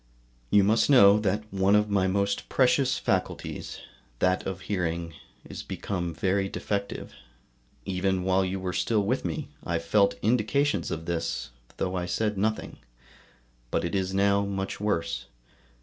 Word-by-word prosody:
You 100 - +5
must 110 +7 +3
know 105 -7 +7
that 105 0 0
one 95 +1 +3
of 105 0 +2
my 95 -2 +2
most 100 +1 -1
precious 130 0 +3
faculties, - - -2 0.4
that 90 +6 +1
of 95 -1 -4
hearing, 85 -4 -2 0.3
is - - -7
become 90 -4 -4
very 95 +4 0
defective; 100 0 -4 0.7
even 95 0 0
while 95 +1 +2
you 95 +1 -2
were 90 -1 -3
still 110 -3 +1
with 125 +6 0
me 80 -4 -4
I 85 - -1
felt 100 +5 +2
indications 125 +6 +1
of 80 0 -4
this, 85 -1 -3 0.3
though 90 - -1
I 90 -1 -2
said 105 +4 0
nothing; 110 +3 -2 0.9
but - - 0
it 85 - -3
is 95 -1 0
now 100 +1 +3
much 95 -1 -3
worse. 80 -12 -1
95 Hz, 150 wpm, -27 LUFS, 90-105 Hz, 0.9 s, know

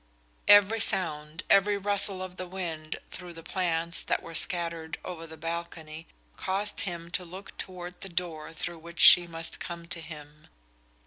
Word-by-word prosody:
Every 205 +2 +7
sound, 165 -6 -1
every 200 +1 +5
rustle 200 -1 +3
of 185 -1 -8
the 185 - -5
wind 165 -4 -5
through 180 -2 -8
the 165 0 -10
plants 170 -2 -1
that - - -1
were 165 - -9
scattered 165 -1 0
over 165 -3 -6
the 160 0 -10
balcony 165 -1 -6 0.3
caused 195 +2 -1
him 170 -3 -5
to 185 - -2
look 185 +3 -10
toward 180 -1 -7
the 195 - -6
door 170 -3 -4
through 170 +1 -5
which 170 +1 -11
she 175 -1 +10
must 165 -1 -6
come 170 -1 -6
to 170 - -3
him. 150 -1 -11
170 Hz, 165 wpm, -29 LUFS, 165-185 Hz, 0.3 s, she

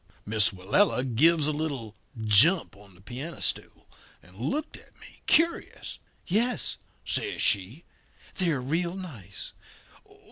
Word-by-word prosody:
"Miss 105 -1 +3
Willella 105 - +2
gives 150 +6 +4
a 155 - +2
little 140 -8 -4 0.2
jump 110 - +5
on 100 -2 -17
the 90 - -19
piano 130 - -7
stool, - - -3 0.4
and 90 +1 -18
looked 215 - -3
at - - -17
me - - -16
curious. 335 +2 +1 0.3
"'Yes,' 235 +7 +1 0.3
says 400 -3 -1
she, 105 - +1 0.5
'they're 165 -7 0
real 170 +7 -1
nice. 125 - -8
140 Hz, 120 wpm, -27 LUFS, 105-175 Hz, 0.5 s, jump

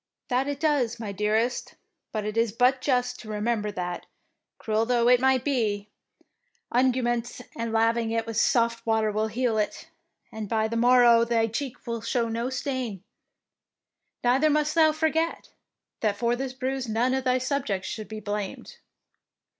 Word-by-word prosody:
" - - -63
That 255 +2 +1
it 285 -1 -3
does, 275 -7 +1
my 215 -3 -4
dearest, 215 +4 -1 0.4
but 215 -2 -3
it 215 0 -3
is 230 -1 +2
but 250 +4 +2
just 250 -2 0
to 220 - -10
remember 210 0 -1
that, 180 -2 -5 0.5
cruel 220 0 0
though 240 -1 +2
it 250 0 +5 0.2
be, 215 -7 -1 0.8
unguents 240 -1 +1 0.2
and 230 -1 -3
laving 225 +1 +2
it 225 0 -1
with 225 - -6
soft 230 +1 +2
water 220 -1 +1
will 215 +1 0
heal 225 0 0
it, 210 +9 -3 0.4
and 215 -2 -6
by 220 -1 +1
the 230 - -4
mor 245 +2 +5
row 235 -1 +6
thy 230 -1 +2
cheek 240 +3 -5
will 230 -2 -3
show 230 +1 0
no 230 +2 -2
stain. 255 -7 -3 1.2
Neither 260 +5 +3
must 300 0 +1
thou 315 -2 +5
forget 320 +1 -1 0.5
that 210 -2 0
for 235 +3 +1
this 260 +1 -4
bruise 260 -1 -3
none 235 +4 +1
of 265 0 0
thy 255 0 +2
subjects 255 -7 -2
should 215 -1 -5
be 220 0 -7
blamed." 205 -2 -5
235 Hz, 165 wpm, -26 LUFS, 220-255 Hz, 1.2 s, row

